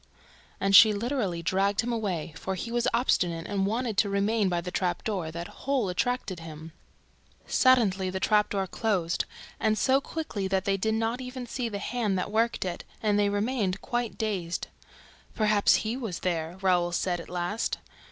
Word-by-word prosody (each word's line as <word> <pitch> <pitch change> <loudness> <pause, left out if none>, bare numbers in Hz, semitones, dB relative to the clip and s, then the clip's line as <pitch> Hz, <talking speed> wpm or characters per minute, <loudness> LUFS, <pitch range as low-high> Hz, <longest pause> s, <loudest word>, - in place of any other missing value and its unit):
And 195 0 +3
she 215 +2 +9
literally 205 -6 -2
dragged 195 +3 +2
him 240 +1 -2
away, 185 -9 -2
for 190 +3 -3
he 230 +6 -5
was 240 0 +1
obstinate 175 -9 +1
and 195 -1 0
wanted 225 0 -1
to 205 - +3
remain 200 +1 +1
by 175 -1 0
the 180 +1 -5
trap 180 -2 -1
door; 190 -7 -2
that 170 +2 -6
hole 265 -7 -1
attracted 195 -1 -1
him. 160 0 -9 0.7
Suddenly, 205 -8 +3
the 190 +1 -3
trap 210 +2 +3
door 200 - -1
was 190 - -4
closed 195 -6 0 0.3
and 215 -1 +2
so 265 +6 +3
quickly 275 -11 -4
that 190 0 0
they 200 -1 +2
did 220 +3 0
not 225 +3 -1
even 250 0 -6
see 240 0 -3
the 205 - -4
hand 210 -2 -1
that 185 - -2
worked 225 -1 +1
it; 175 -2 -4 0.2
and 205 -1 +3
they 205 0 +3
remained 205 -2 0
quite 240 -2 -2
dazed. 190 -6 -2 0.7
"Perhaps 215 -2 +4
HE 225 +3 -1
was 220 -10 -5
there," 170 -1 -2
Raoul 175 -2 +3
said, 175 0 0
at 170 - -9
last. 180 +5 -2
200 Hz, 180 wpm, -28 LUFS, 180-230 Hz, 0.7 s, she